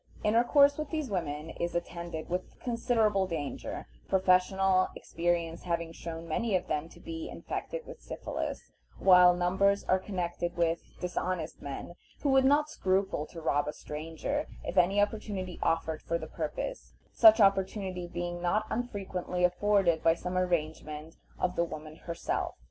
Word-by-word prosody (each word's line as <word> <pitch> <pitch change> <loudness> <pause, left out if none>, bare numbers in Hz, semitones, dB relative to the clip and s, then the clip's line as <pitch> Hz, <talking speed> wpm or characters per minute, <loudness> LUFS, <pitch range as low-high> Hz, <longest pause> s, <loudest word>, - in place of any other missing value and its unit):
Intercourse 280 +7 +5
with 305 -1 -3
these 310 -7 -3
women 160 -4 -3
is 170 0 -3
attended 170 -2 -4
with 180 +1 -4
considerable 225 -5 +1
danger, 155 -5 -4 0.2
professional 185 0 +4
experience 170 -1 -1
having 170 -2 -2
shown 165 0 -7
many 215 +5 0
of 180 - 0
them 155 +2 -2
to - - -15
be 325 0 -6
infected - - -5
with - - -10
syphilis, - - -5 0.3
while 180 -1 +7
numbers 190 +3 +2
are 185 - +2
connected 175 -3 -3
with 170 -1 +1 0.2
dishonest 180 -2 -3
men 140 +4 -6 0.3
who 285 - +2
would 265 0 +5
not 290 +2 +4
scruple 190 - 0
to 170 - -9
rob 145 -2 +1
a 150 - -2
stranger, 165 - -4 0.2
if - - -4
any 190 +3 +4
opportunity 205 -3 -1
offered 165 -1 0
for 170 - -1
the 160 - -6
purpose, 160 - -5 0.2
such 330 -6 +8
opportunity 195 -2 +2
being 175 0 -4
not 210 +5 +1
unfrequently 195 -6 -2
afforded 180 -2 +3
by 165 0 +4
some 180 +1 -5
arrangement 160 -3 -2 0.2
of 180 0 0
the 170 - +2
woman 155 -1 -7
herself. 170 0 -2
180 Hz, 150 wpm, -30 LUFS, 165-205 Hz, 0.3 s, such